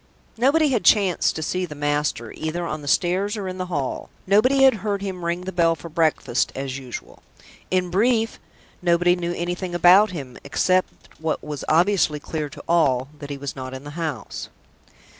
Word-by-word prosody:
Nobody 285 +6 +3
had 240 -5 0
chanced 195 -5 +3
to 160 - -3
see 185 +4 -1
the 150 - -9
master, 145 -5 -1
either 170 +2 -4
on 155 -2 -4
the 145 - -9
stairs 190 +7 +1
or 200 -2 -4
in 185 0 -5
the 185 - -3
hall; 145 -7 -3 0.2
nobody 255 +8 +4
had 265 -4 +6
heard 200 -1 -2
him 185 -3 -5
ring 170 +1 -1
the 185 +1 -5
bell 170 -2 +3
for 170 - -10
breakfast, 155 -6 +1
as 135 0 -4
usual. 125 -2 -9 0.5
In 180 -1 0
brief, 225 +3 +1 0.4
nobody 175 0 +3
knew 175 -1 -3
anything 175 +1 -3
about 185 +5 +6
him, 140 -9 -7
except 185 +6 +1 0.3
what 160 0 -2
was 150 -2 -5
obviously 170 -2 +3
clear 150 0 -4
to 140 - -11
all 140 -6 +2
that 145 - -8
he 140 - -4
was 140 -1 -6
not 130 -1 -6
in 130 - -8
the 145 - -8
house. 155 -6 -5
170 Hz, 185 wpm, -23 LUFS, 145-190 Hz, 0.5 s, had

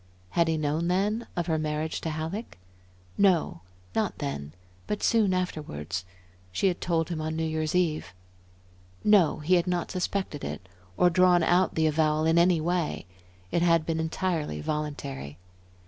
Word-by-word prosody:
Had 170 -1 +2
he 160 -1 +1
known 155 +3 0
then 205 +6 0
of 175 - -1
her 160 -1 0
marriage 155 +1 -2
to 165 - -2
Halleck? 160 +8 -5 0.6
No, 180 - +3 0.3
not - - 0
then, 70 +1 -4 0.4
but 210 - -3
soon 220 -5 +3
afterwards. 100 - -3 0.5
She 195 - +2
had 180 - -4
told 165 -2 0
him 165 -3 -3
on 160 0 -2
New 160 - -1
Year's 155 0 -1
Eve. 155 - 0 0.9
No, 190 -8 +4
he 165 +5 +1
had 175 0 +3
not 175 -1 -1
suspected 185 -4 -2
it, 95 - -5 0.3
or 180 - +5
drawn 180 -1 +5
out 180 +3 +3
the 160 - +2
avowal 155 0 +2
in 165 +1 +4
any 175 -1 +4
way. 170 0 -1 0.5
It 170 - +1
had 165 -2 +3
been 165 -1 -1
entirely 160 - -1
voluntary. 140 - -4
160 Hz, 160 wpm, -27 LUFS, 155-180 Hz, 0.9 s, or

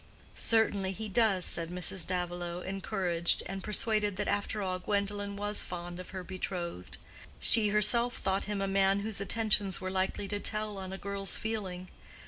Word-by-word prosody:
"Certainly 205 -4 +2
he 220 +3 -5
does," 205 -3 +2
said 165 -1 +3
Mrs. 180 0 0
Davilow, 175 -1 -3
encouraged, 190 -3 0
and 195 0 -6
persuaded 210 -2 +2
that 205 - -1
after 205 +1 -1
all 185 -1 -2
Gwendolen 200 +1 -2
was 205 +1 -1
fond 175 0 -6
of 185 - -9
her 185 -1 -6
betrothed. 175 - -5 0.4
She 220 -2 +6
herself 235 +4 +3
thought 195 +1 -1
him 205 -1 -3
a - - -1
man 195 0 +2
whose 210 -1 -3
attentions 205 -2 +2
were 185 0 -4
likely 190 +1 -1
to 205 - -2
tell 215 -1 -2
on 190 -1 -6
a 190 - -5
girl's 195 -1 +1
feeling. 190 -5 -4
195 Hz, 165 wpm, -31 LUFS, 185-210 Hz, 0.4 s, She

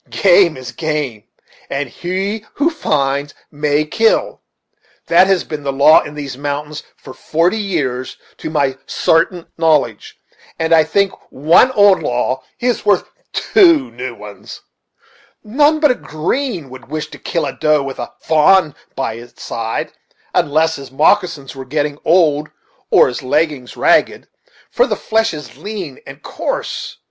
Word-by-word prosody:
Game 180 -5 +4
is 130 -2 -8
game, 145 -9 -3 0.4
and 140 +1 -2
he 190 - -3
who 310 +4 +1
finds 140 - -1 0.2
may 150 0 0
kill; 455 - +1 0.6
that 190 - +5
has 190 -3 +2
been 150 -2 -6
the 140 -1 -2
law 145 +3 +6
in 150 - -9
these 140 -3 -6
mountains 145 +1 -4 0.2
for 130 - -12
forty 170 +10 0
years 140 -11 -3 0.2
to - - -6
my 140 -4 0
sartain 165 +1 +1
knowledge; 150 -10 +1 0.4
and 160 0 +1
I 160 -1 +5
think 195 +5 +1 0.2
one 160 - +4
old 205 -3 +5
law 125 +2 -1 0.2
is 245 -1 0
worth 205 -3 +1 0.2
two 335 -9 +3
new 125 0 -6
ones. 105 -1 -11 0.8
None 290 +8 +2
but 300 -3 +4
a - - +3
green 190 - -3
one 135 - -16
would - - -19
wish 155 0 -4
to - - -11
kill 165 -3 -2
a - - -4
doe 155 -2 +1
with 135 -1 -6
a 120 - -5
fa'n 160 0 +4 0.2
by 135 -4 -2
its 120 +2 -12
side, 115 -1 -4 0.4
unless 160 +2 +1
his 140 -1 -10
moccasins 150 -2 +1
were 135 - -7
getting 145 +2 -2
old, 155 -3 +3 0.4
or - - +5
his 125 - -4
leggins 145 -1 -1
ragged, - - +2 0.4
for - - +2
the - - -1
flesh 225 0 0
is 150 -2 -9
lean 195 -10 -6
and - - -11
coarse. - - -4
155 Hz, 155 wpm, -17 LUFS, 135-190 Hz, 0.8 s, law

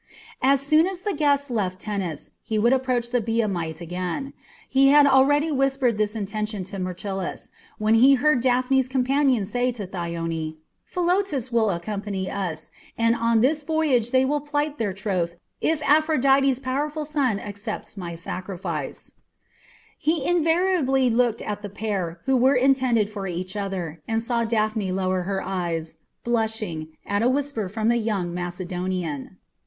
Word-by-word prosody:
As 275 +1 +4
soon 310 +4 +4
as 375 -2 -5
the 410 0 -1
guests 285 -2 +1
left 190 -5 -1
Tennis 190 -7 -4
he 220 - -2
would 235 +4 +4
approach 250 -2 0
the 245 -1 +2
Biamite 195 -8 -1
again. 180 - -4 0.3
He 270 +1 +4
had 290 +1 +7
already 290 +3 +4
whispered 270 -5 +1
this 210 +1 0
intention 210 -1 -3
to 195 +1 -7
Myrtilus, 185 +1 -4 0.3
when 215 +1 +2
he 260 +5 +7
heard 280 -1 +3
Daphne's 255 +1 +2
companion 260 -3 +2
say 245 +5 0
to 215 -4 -5
Thyone, 165 -3 -4 0.3
"Philotas 350 - 0
will 225 -2 +3
accompany 195 +1 -3
us, 175 -6 -4 0.3
and 230 0 +3
on 230 -1 +2
this 295 +5 +2
voyage 295 -7 +1
they 260 +1 +3
will 295 +2 +1
plight 290 0 -2
their 215 -4 0
troth 185 -4 -2 0.3
if 315 -1 +1
Aphrodite's 275 -3 +4
powerful 290 +4 -2
son 275 -8 0
accepts 205 +2 -6
my 175 -4 -6
sacrifice." 170 -3 -5 0.9
He 310 -1 +1
involuntarily 325 -6 +2
looked 235 -1 +1
at 205 -1 -4
the 205 - -6
pair 195 -5 -3
who 265 - +3
were 260 +2 +4
intended 255 -4 +3
for 205 -2 -5
each 185 +2 -4
other, 185 -6 -4
and 225 0 0
saw 235 -1 0
Daphne 215 -3 0
lower 185 0 0
her 195 -1 -1
eyes, 170 -4 -3 0.2
blushing, 220 -9 -1 0.2
at 200 +1 0
a 240 - +4
whisper 270 -7 -1
from 220 +3 0
the 235 - +3
young 200 -6 -1
Macedonian. 180 -3 -4
225 Hz, 150 wpm, -24 LUFS, 190-270 Hz, 0.9 s, had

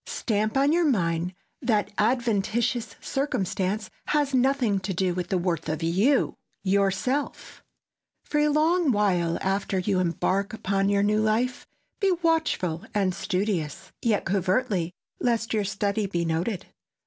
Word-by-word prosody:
Stamp 215 +1 -1
on 280 +2 +4
your 340 -2 +3
mind 175 -5 0 0.3
that 220 -5 +1
adventitious 230 0 +1
circumstance 210 -6 -2 0.2
has 290 -2 +1
nothing 255 -5 +2
to 190 0 -4
do 185 0 +1
with 180 0 -3
the 185 - 0
worth 170 -3 -1
of 155 +1 -2
YOU, 200 - +2 0.3
YOURSELF! 200 +8 -1 0.6
For 295 - -1
a 300 - +4
long 310 +1 +3
while 180 -6 +1
after 195 0 0
you 185 +1 +1
embark 185 +3 0
upon 195 -2 0
your 200 0 +2
new 210 +1 +2
life, 230 +4 0 0.3
be 395 -4 +3
watchful 315 - +1
and 195 -3 +2
studious—yet 190 +2 -2
covertly, 190 -1 0 0.3
lest 230 -2 0
your 215 -2 +1
study 200 +1 -1
be 170 -3 -1
noted. 170 +4 -1
205 Hz, 135 wpm, -26 LUFS, 185-245 Hz, 0.6 s, on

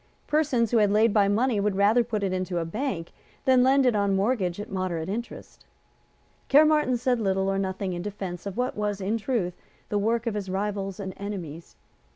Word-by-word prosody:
Persons 270 -7 +1
who 240 - +3
had 210 -2 +4
laid 215 +1 +3
by 205 -2 +4
money 220 +2 +1
would 200 -1 0
rather 210 +5 +4
put 215 -3 -3
it 190 -1 0
into 185 -1 -2
the 170 -1 -1
Bank 185 - -3 0.3
than 260 -1 +5
lend 265 +1 +4
it 245 -3 +3
on 200 -1 +1
mortgage 195 -3 0
at 210 - -7
moderate 185 -3 -2
interest. 235 +4 -7 0.9
Caermarthen 300 -3 +4
said 245 0 0
little 195 -2 0
or 195 0 0
nothing 190 -1 -2
in 175 - -4
defence 195 -2 -6
of 200 - -6
what 250 +1 -1
was, 210 -1 -2
in 205 +4 -1
truth, 215 -7 -1 0.4
the 205 - 0
work 230 +3 0
of 230 - -1
his 200 -2 -4
rivals 195 0 -3
and 190 -2 -5
enemies. 175 -6 -7
205 Hz, 195 wpm, -26 LUFS, 190-235 Hz, 0.9 s, than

